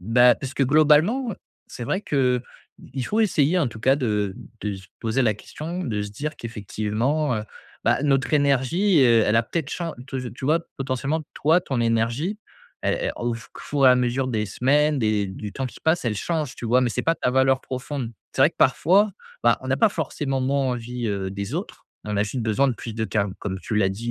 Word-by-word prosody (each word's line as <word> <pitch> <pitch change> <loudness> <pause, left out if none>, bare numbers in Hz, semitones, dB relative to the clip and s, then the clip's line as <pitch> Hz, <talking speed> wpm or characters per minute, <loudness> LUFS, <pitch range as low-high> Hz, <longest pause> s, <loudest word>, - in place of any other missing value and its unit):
bah, 120 +5 +5
parce 135 0 -6
que 140 - +1
globalement, 155 - +4
heu, - - -9 0.3
c'est 120 - -7
vrai 190 +11 -1
qu'il 130 -8 +1 0.6
faut 220 - 0
essayer 175 -5 +3
en 145 -8 +1
tout 110 -1 -10
cas 135 +2 +4
de 105 -8 -1 0.3
de 105 -1 -2
se 95 0 -11
poser 115 +3 0
la 110 -4 +3
question, 165 - -6
de 110 -6 -2
se 105 0 -4
dire 150 +9 -4
qu'effectivement, 115 +6 -2
heu, 105 - -3 0.4
bah, - - +2
notre 135 -1 +1
énergie, 145 +6 +3
heu, 115 -2 +5
elle 105 - +3
a 115 - +4
peut-être 150 +4 -3
chan 170 -2 -4
tu 125 -4 -5
tu 130 - -8
vois? 160 +3 +3 0.2
Potentiellement 135 +3 -1
toi 160 +5 +3
ton 135 -7 -3
énergie, 115 - 0 0.4
elle - - +1
elle - - -1
au 120 - -1
qu 115 - -7 0.2
four 140 -2 +2
et - - +9
à - - +7
mesure 125 +1 0
des 110 -4 -1
semaines 145 +7 +2
des 110 -3 +1
du 100 +2 -7
temps 135 -1 -3
qui - - -11
passe, 160 -2 +1
elle 115 - 0
change, 155 +1 -2
tu - - -8
vois? 125 +3 +4
Mais 125 - +1
c'est - - -2
pas 165 - +2
ta 125 - 0
valeur 130 0 +3
profonde. 130 -2 -5 0.2
C'est - - +2
vrai - - +6
que - - -37
parfois, 200 +6 +4 0.3
bah, 120 0 +5
on - - -7
n'a 135 - +2
pas 220 - +5
forcément 145 -6 -2
moins 135 +1 +1
envie, 120 0 -4
heu, 95 -2 -2
des 100 +7 -5
autres. 180 +5 -6 0.2
On 105 -1 -3
a 100 - +3
juste 125 +5 -4
besoin 110 +5 +2
de 125 - 0
plus 115 -1 -7
de 110 0 -1
calme. 100 -3 -1
Comme 95 -2 -3
tu 110 - -4
l'as 105 -3 +3
dit, 115 +5 -4
130 Hz, 225 wpm, -24 LUFS, 110-150 Hz, 0.6 s, et